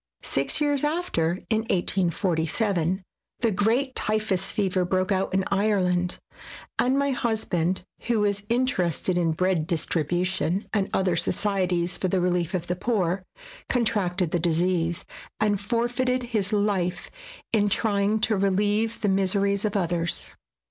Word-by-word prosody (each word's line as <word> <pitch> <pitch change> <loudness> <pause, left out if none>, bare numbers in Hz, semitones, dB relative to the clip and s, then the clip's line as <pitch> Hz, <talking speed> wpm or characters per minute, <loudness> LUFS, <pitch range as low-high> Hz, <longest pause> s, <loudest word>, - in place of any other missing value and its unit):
Six - - 0
years 290 -2 +1
after, 295 - 0
in 220 - +3
1847, 180 +1 +1 0.4
the 230 -2 +2
great 230 +7 +1
typhus 210 -5 +1
fever 190 -3 0
broke 185 +2 0
out 190 0 0
in 190 0 +1
Ireland, 185 -3 +1 0.6
and 260 +2 +3
my 280 0 +1
husband, 190 -8 -1 0.2
who 230 -3 +2
was 200 -1 +1
inter 245 -6 +1
ested 175 +2 -1
in 170 -2 +1
bread 180 -2 0
distribution 175 +4 0
and 200 -3 +1
other 185 -2 +1
socie 190 +2 0
ties 175 +1 -1
for 185 - 0
the 185 +1 +1
relief 180 0 0
of 175 -2 -2
the 180 - -2
poor, 185 -3 0 0.5
contracted 190 -8 +1
the 175 - +1
disease 170 0 +1 0.3
and 205 -2 +1
forfeited 245 +3 0
his 205 -2 +1
life 195 -4 0 0.4
in 205 -2 +3
trjdng 205 0 +1
to 220 -3 +2
relieve 205 +3 +1
the 210 - +1
miseries 200 +1 +1
of 210 0 -1
others. 175 -2 -2
195 Hz, 140 wpm, -25 LUFS, 180-215 Hz, 0.6 s, in